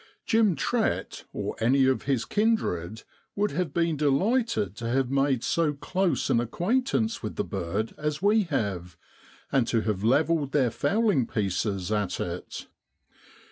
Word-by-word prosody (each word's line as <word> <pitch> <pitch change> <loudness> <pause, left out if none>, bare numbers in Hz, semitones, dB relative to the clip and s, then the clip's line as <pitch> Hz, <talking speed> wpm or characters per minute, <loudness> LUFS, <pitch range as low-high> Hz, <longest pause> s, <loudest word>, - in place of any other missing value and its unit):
Jim 220 -5 +3
Trett, 225 - -1
or - - -4
any 130 +4 +3
of 130 0 +1
his 135 -5 0
kindred, 110 - 0 0.3
would 205 +1 0
have 165 0 -2
been 165 +1 +1
delighted 150 - +1
to 115 +1 -4
have 130 +1 0
made 135 -3 +1
so 165 -3 +1
close 175 +1 -1
an 115 - +4
acquaintance 225 - 0
with - - -5
the 205 - -1
bird 100 - -3
as 150 0 -2
we 205 +2 +3
have, 95 - -3 0.5
and 130 -4 +2
to 115 -2 +1
have 105 -3 -2
levelled 145 +4 +2
their 130 -5 +3
fowling 200 - +1
pieces 100 -1 -2
at 105 -4 -1
it. 90 0 -5
135 Hz, 145 wpm, -27 LUFS, -, 0.5 s, an